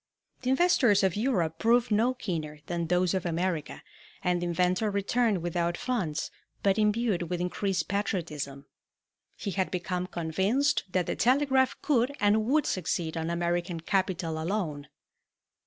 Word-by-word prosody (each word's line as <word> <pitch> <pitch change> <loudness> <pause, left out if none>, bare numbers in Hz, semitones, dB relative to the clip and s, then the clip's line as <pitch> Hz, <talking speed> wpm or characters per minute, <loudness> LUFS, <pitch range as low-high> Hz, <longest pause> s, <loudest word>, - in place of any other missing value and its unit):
The 255 - -2
investors 260 - +4
of 190 -3 +2
Europe 185 -9 0
proved 235 +2 +3
no 230 +5 +3
keener 160 -10 -4
than 170 -1 -2
those 180 +1 +2
of 190 -2 -1
America, 170 -2 -2 0.4
and 180 -1 +1
the 175 - -1
inventor 180 +5 +1
returned 200 -1 +1
without 170 0 -1
funds, 205 -12 -2 0.3
but 195 +1 +3
imbued 210 -5 +1
with 180 -1 -2
increased 180 0 -1
patriotism. 155 -9 -3 0.7
He 200 - -4
had 190 0 0
become 180 0 -2
convinced 190 - 0
that 185 -2 +1
the - - -2
telegraph 265 +1 +3
could 275 -1 +2
and 210 +1 +3
would 295 +5 +2
succeed 170 -2 -1
on 165 0 -2
American 170 0 -1
capital 175 -3 -1
alone. 160 -6 -2
185 Hz, 140 wpm, -28 LUFS, 170-220 Hz, 0.7 s, investors